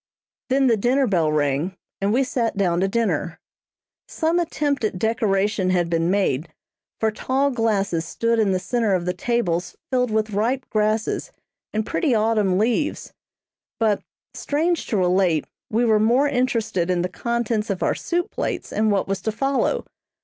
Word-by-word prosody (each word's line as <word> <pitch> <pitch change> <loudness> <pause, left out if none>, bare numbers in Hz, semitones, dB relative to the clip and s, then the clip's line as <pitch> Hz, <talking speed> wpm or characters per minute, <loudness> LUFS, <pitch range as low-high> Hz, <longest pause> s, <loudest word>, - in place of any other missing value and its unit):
Then 270 +1 +3
the 235 -3 +4
dinner 255 +6 +2
bell 170 -8 +1
rang, 150 +4 0 0.2
and 200 +1 +1
we 255 +5 +3
sat 235 -4 -1
down 175 -4 +1
to 190 - +2
dinner. 190 -6 -1 0.7
Some 330 +2 0
attempt 295 -6 -1
at 210 -4 -1
decoration 205 -3 +1
had 175 -2 +1
been 165 0 +1
made, 175 -6 0 0.5
for 220 -1 +1
tall 270 +6 0
glasses 200 -8 0
stood 230 +7 0
in 210 -3 +3
the 185 - +2
centre 210 +2 0
of 175 -1 -2
the 180 - 0
tables 185 -8 -1 0.2
filled 250 -1 +2
with 215 0 0
ripe 240 +6 0
grasses 215 0 0 0.4
and 215 0 -1
pretty 275 -1 +1
autumn 215 -4 +2
leaves, 235 +8 0 0.7
but, 215 -3 +2 0.3
strange 320 +3 -1
to 215 - 0
relate, 180 -4 +2 0.2
we 230 +3 +1
were 220 -2 +4
more 240 +7 +3
interested 225 -9 0
in 175 -1 +1
the - - 0
contents 230 +2 -2
of 195 -2 -2
our - - +2
soup 350 0 -2
plates - - -3
and 215 0 +2
what 200 -1 +1
was 195 0 -2
to 220 - -1
follow. 270 +5 0
215 Hz, 165 wpm, -22 LUFS, 185-240 Hz, 0.7 s, the